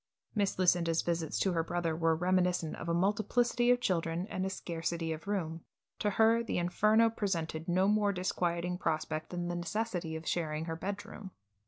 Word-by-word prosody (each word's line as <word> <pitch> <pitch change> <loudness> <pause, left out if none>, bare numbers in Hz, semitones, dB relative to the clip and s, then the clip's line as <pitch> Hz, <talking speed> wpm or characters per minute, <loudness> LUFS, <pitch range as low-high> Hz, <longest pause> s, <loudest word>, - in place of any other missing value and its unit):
Miss 205 -3 0
Lucinda's 170 -3 +3
visits 165 -2 -1
to 190 - +2
her 165 -2 +1
brother 170 -1 -1
were 165 0 +2
reminiscent 180 -1 +1
of 170 - -5
a - - +2
multiplicity 220 +6 +2
of 245 0 +5
children 170 -4 0
and 185 - -2
a 190 - 0
scarcity 165 -2 -3
of 160 +4 -9
room. 165 -5 -2 0.4
To 210 - +1
her 225 +3 +4
the - - -2
Inferno 215 +6 +3
presented 165 -7 -2
no 185 +2 +3
more 210 -1 +3
disquieting 180 -1 -1
prospect 155 -1 -2
than 175 -1 -3
the 175 - -2
necessity 175 -2 -2
of 160 0 -7
sharing 155 -2 -1
her 165 -1 -3
bedroom. 200 +2 -6
175 Hz, 175 wpm, -32 LUFS, 165-200 Hz, 0.4 s, of